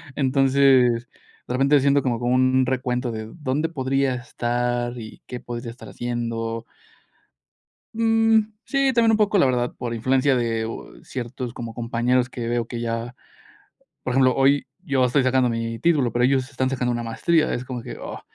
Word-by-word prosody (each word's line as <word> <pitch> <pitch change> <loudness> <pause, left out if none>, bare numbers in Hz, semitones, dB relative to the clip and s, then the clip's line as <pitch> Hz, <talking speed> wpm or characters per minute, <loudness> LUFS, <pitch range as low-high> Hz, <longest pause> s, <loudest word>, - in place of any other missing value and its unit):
Entonces, 130 -3 +3 0.4
de - - -3
repente 135 +3 +4
siento 140 +1 +3
como 120 -3 0
como 120 +1 0
un 130 0 +3
recuento 125 -1 -1
de 110 0 -6
dónde 150 +3 -1
podría 135 -3 0
estar, 120 0 -2
y 110 -2 -10
qué 125 - -6
podría 120 -1 -6
estar 125 - -12
haciendo. 115 -1 -3 1.3
Mm, 225 -1 +3
sí, 275 -1 +2
también 230 -1 +4
un 220 - +3
poco 210 -1 +2
la 160 - +5
verdad 125 -1 0
por 120 -1 -4
influencia 130 +3 +2
de 115 -2 -1 0.4
ciertos 125 -1 -6
como 115 -2 -7
compañeros, 120 +2 0
que 120 -2 -5
veo 120 -1 -1
que 120 - -5
ya 115 +1 -3 0.9
por 125 - -2
ejemplo, 130 -1 +4
hoy 135 +1 +3
yo 140 -8 0
estoy 130 +2 +2
sacando 130 -1 +2
mi 115 0 -3
título, 140 -3 +2
pero 120 0 +1
ellos 130 0 +1
están 130 -1 -1
sacando 125 -2 -1
una 120 0 -2
maestría, 155 +8 +1
es 125 - -4
como 125 -2 -5
que, - - -8
oh, - - -7
125 Hz, 170 wpm, -23 LUFS, 120-135 Hz, 1.3 s, la